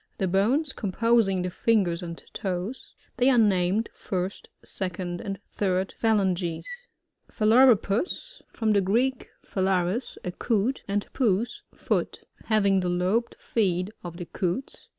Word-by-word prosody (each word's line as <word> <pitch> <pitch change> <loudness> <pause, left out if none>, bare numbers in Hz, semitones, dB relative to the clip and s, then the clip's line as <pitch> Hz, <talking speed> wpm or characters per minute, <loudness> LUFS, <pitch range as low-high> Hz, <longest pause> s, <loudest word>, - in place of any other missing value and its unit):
The 190 - 0
bones 245 - +2
com 200 - -3
posing 225 -4 +3
the 180 - -2
fingers 185 -4 +1
and 170 -1 -6 0.2
toes. 190 +6 -4 0.2
They 250 +2 +4
are 255 - +4
named, 205 0 +2
first, 185 +1 -4 0.2
second, 180 -2 -4
and 195 -1 -5
third 190 -1 0
phalanges. 190 -6 0 0.7
Phalaropus. 240 - +3
— - - -39
BVom 220 -2 +1
the 200 - +4
Greek, 240 +7 0
pha - - -6
lariSt 190 +5 0
a 180 - -3
Coot, 230 +6 0
and 205 0 -1
pays, 230 -2 0
foot - - -2 0.2
Having 200 -3 +3
the 180 -1 -1
lobed 185 +7 0
feet 185 -3 0
of 170 -1 -7
the 175 - -5
Coots. 185 +9 -3
195 Hz, 140 wpm, -26 LUFS, 180-230 Hz, 0.7 s, They